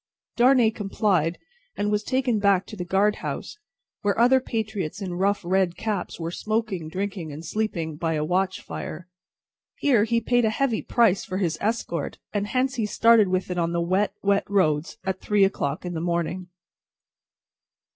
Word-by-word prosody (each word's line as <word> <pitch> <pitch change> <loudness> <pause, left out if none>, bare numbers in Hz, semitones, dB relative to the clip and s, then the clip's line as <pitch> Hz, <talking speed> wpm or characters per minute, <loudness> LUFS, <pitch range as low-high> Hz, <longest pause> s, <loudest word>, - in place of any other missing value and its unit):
Darnay 245 -2 +5
complied, 195 -5 0 0.4
and 205 0 0
was 210 0 +1
taken 255 -3 0
back 200 -2 +3
to - - -9
the 180 - -4
guard 195 +4 +2
house, 420 - -5 0.4
where 205 -1 0
other 250 +3 +5
patriots 215 -8 -3
in 190 -3 -4
rough 195 +3 +1
red 180 -1 +1
caps 210 -6 -3
were 165 0 -3
smoking, 215 -5 -2
drinking, 190 -3 -4
and 155 +3 -8
sleeping, 165 -6 -2
by 165 0 -1
a 150 0 -1
watch 185 +3 0
fire. 170 +3 -7 0.7
Here 240 -7 +3
he 230 0 +1
paid 245 +1 +2
a 220 - +3
heavy 240 0 0
price 225 -4 +2
for 185 -3 -4
his 175 -5 0
escort, 205 -8 -2 0.2
and 205 -1 -1
hence 255 +4 0
he 220 -3 0
started 230 0 +5
with 185 0 -1
it 180 - -1
on 170 0 0
the 170 - 0
wet, 185 +4 +1
wet 200 0 +1
roads 160 -6 +1
at 190 -1 -3
three 205 -1 +3
o'clock 160 -6 -1
in 175 - -4
the 160 - -3
morning. 170 +1 -2
195 Hz, 175 wpm, -25 LUFS, 175-220 Hz, 0.7 s, Darnay